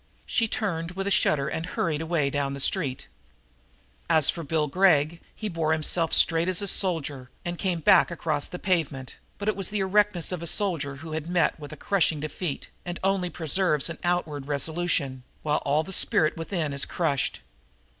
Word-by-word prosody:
She 230 -2 +1
turned 175 -6 -2
with 195 +1 -3
a 200 - 0
shudder 140 -7 +3
and 160 - -3
hurried 160 -3 -2
away 160 -4 0
down 140 -1 -1
the - - -7
street. 140 -3 -1 1.0
As 155 -3 +4
for 170 - -6
Bill 155 0 0
Gregg 165 0 +3
he 215 - -4
bore 165 -4 0
himself 160 +1 0
straight 165 +1 +4
as 185 -2 +1
a 200 - -1
soldier 145 -10 0 0.2
and 175 0 -2
came 180 -4 -1
back - - +6
across 155 -4 -2
the 180 - -6
pavement, 155 -9 -1 0.2
but 205 - -5
it 215 - +2
was 195 -2 0
the 210 - -2
erectness 195 -2 +2
of 180 -3 -3
a 170 - -5
soldier 165 -8 0
who 160 - -7
has 155 0 -4
met 175 -2 +1
with 145 -1 -9
a 155 - -8
crushing 165 -3 +1
defeat 155 0 -4 0.2
and 175 -1 -5
only 190 -2 +1
preserves 165 -1 +1
an 165 - -8
outward 160 -6 -1
resolution, 145 -2 -1 0.2
while 150 0 +1
all 145 +3 +2
the 190 - -7
spirit 155 -3 +3
within 165 -3 -2
is 140 - 0
crushed. 150 -6 -1
165 Hz, 185 wpm, -26 LUFS, 150-180 Hz, 1.0 s, back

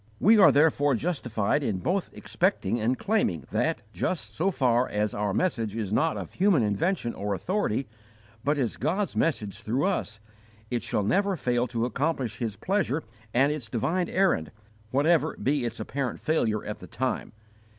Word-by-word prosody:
We 220 +3 +6
are 190 - +8
therefore 145 -2 +3
justified 130 - -1
in 105 -7 0
both 180 - -1
expecting 120 - 0
and 120 +4 +1
claiming 100 - 0
that, 110 - 0
just 180 - -2
so 180 +5 +1
far 125 -7 +2
as 105 0 -1
our 105 -1 -1
message 115 - 0
is 105 -3 -3
not 160 +7 +2
of - - -7
human 180 - +3
invention 120 - 0
or 100 0 -2
authority, 135 - -1 0.6
but 145 +1 +1
is 125 -5 -1
God's 185 +9 -1
message 110 -10 -1
through 120 +7 0
us, 115 - -1 0.5
it 120 -1 0
shall 105 - -1
never 195 - +2
fail 125 -3 0
to 115 -1 -1
accomplish 135 0 -2
His 115 -5 -2
pleasure 175 - 0 0.3
and 135 +5 +3
its 140 -8 -4
divine 165 +11 0
errand, 185 - +2 0.4
whatever 150 +6 +2
be 140 -2 0
its 115 0 -4
apparent 135 -2 -3
failure 115 -9 0
at 105 - -5
the - - -10
time. 130 -2 -3
130 Hz, 165 wpm, -27 LUFS, 110-170 Hz, 0.6 s, are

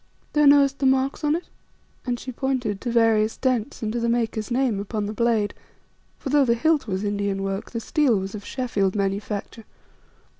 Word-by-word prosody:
"Thou 295 -1 +4
knowest 280 -1 +5
the 270 - +2
marks 265 +3 +1
on 295 +1 +2
it," 345 - -3 0.6
and 245 -1 -1
she 255 - -6
pointed 250 -6 -2
to 245 - -3
various 225 -2 +3
dents 250 -4 -1
and 215 0 -2
to 240 - -1
the 235 0 0
maker's 225 -2 -1
name 245 -4 +1
upon 210 +1 -3
the 210 - -4
blade; 220 -3 +1 0.6
for 275 - -6
though 290 +1 +4
the 235 -3 +2
hilt 315 +3 +1
was 190 0 -2
Indian 200 -1 -1
work 195 +1 -3
the 230 - -4
steel 255 -1 +2
was 195 0 -4
of 210 -1 -7
Sheffield 205 -7 -1
manufacture. 205 +2 -3
230 Hz, 190 wpm, -24 LUFS, 205-265 Hz, 0.6 s, knowest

